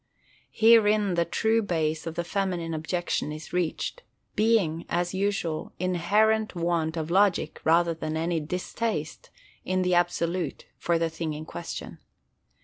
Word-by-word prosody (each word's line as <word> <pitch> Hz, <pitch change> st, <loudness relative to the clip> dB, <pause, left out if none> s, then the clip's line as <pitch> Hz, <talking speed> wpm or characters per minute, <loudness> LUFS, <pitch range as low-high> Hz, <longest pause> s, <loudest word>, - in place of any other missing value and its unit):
Herein 215 Hz, -3 st, +5 dB
the 170 Hz, -1 st, +2 dB
true 220 Hz, +6 st, +1 dB
base 160 Hz, -5 st, -1 dB
of 165 Hz, -, -4 dB
the 170 Hz, -, -1 dB
feminine 175 Hz, -3 st, -2 dB
objection 160 Hz, 0 st, -2 dB
is 155 Hz, +1 st, -8 dB
reached; 180 Hz, -, -2 dB, 0.3 s
being, 210 Hz, -8 st, +2 dB
as 175 Hz, +1 st, 0 dB
usual, 190 Hz, -5 st, -1 dB
inherent 205 Hz, +5 st, +2 dB
want 170 Hz, -1 st, 0 dB
of 160 Hz, +1 st, -3 dB
logic 190 Hz, -4 st, +2 dB
rather 170 Hz, +1 st, +4 dB
than 160 Hz, -1 st, -4 dB
any 165 Hz, +1 st, 0 dB
distaste, 215 Hz, -, -3 dB, 0.3 s
in 185 Hz, 0 st, 0 dB
the 180 Hz, 0 st, +1 dB
absolute, 175 Hz, 0 st, 0 dB
for 170 Hz, -1 st, 0 dB
the 165 Hz, 0 st, 0 dB
thing 160 Hz, -1 st, -3 dB
in 155 Hz, +1 st, -7 dB
question. 85 Hz, -, -7 dB
175 Hz, 140 wpm, -27 LUFS, 160-200 Hz, 0.3 s, Herein